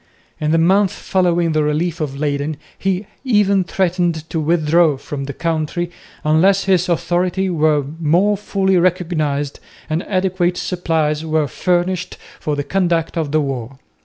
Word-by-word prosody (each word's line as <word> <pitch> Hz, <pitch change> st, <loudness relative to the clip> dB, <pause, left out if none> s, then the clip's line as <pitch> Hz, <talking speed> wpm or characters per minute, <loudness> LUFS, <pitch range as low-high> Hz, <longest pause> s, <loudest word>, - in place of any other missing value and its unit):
In 150 Hz, -, -1 dB
the 165 Hz, -, +3 dB
month 190 Hz, +4 st, +3 dB
following 175 Hz, -3 st, +1 dB
the 155 Hz, -1 st, +1 dB
relief 160 Hz, +3 st, -1 dB
of 140 Hz, -3 st, -3 dB
Leyden 145 Hz, 0 st, -1 dB, 0.2 s
he 190 Hz, +1 st, -1 dB, 0.2 s
even 205 Hz, -6 st, +3 dB
threatened 175 Hz, -3 st, -1 dB
to 165 Hz, -, -1 dB
withdraw 160 Hz, -1 st, +3 dB
from 140 Hz, +1 st, -6 dB
the 140 Hz, -, -4 dB
country 165 Hz, +2 st, -2 dB, 0.3 s
unless 185 Hz, +6 st, +3 dB
his 185 Hz, -1 st, +2 dB
authority 180 Hz, +2 st, 0 dB
were 155 Hz, -3 st, +2 dB
more 175 Hz, +6 st, +3 dB
fully 190 Hz, -2 st, +1 dB
recognised 165 Hz, -6 st, 0 dB, 0.3 s
and 160 Hz, +2 st, +1 dB
adequate 185 Hz, -2 st, 0 dB
supplies 160 Hz, -4 st, -1 dB
were 155 Hz, -2 st, 0 dB
furnished 180 Hz, +2 st, -1 dB, 0.2 s
for 150 Hz, -, -2 dB
the 145 Hz, -, -2 dB
conduct 175 Hz, -2 st, 0 dB
of 160 Hz, -4 st, -2 dB
the 155 Hz, 0 st, +2 dB
war. 135 Hz, -2 st, -4 dB
170 Hz, 145 wpm, -18 LUFS, 155-185 Hz, 0.3 s, the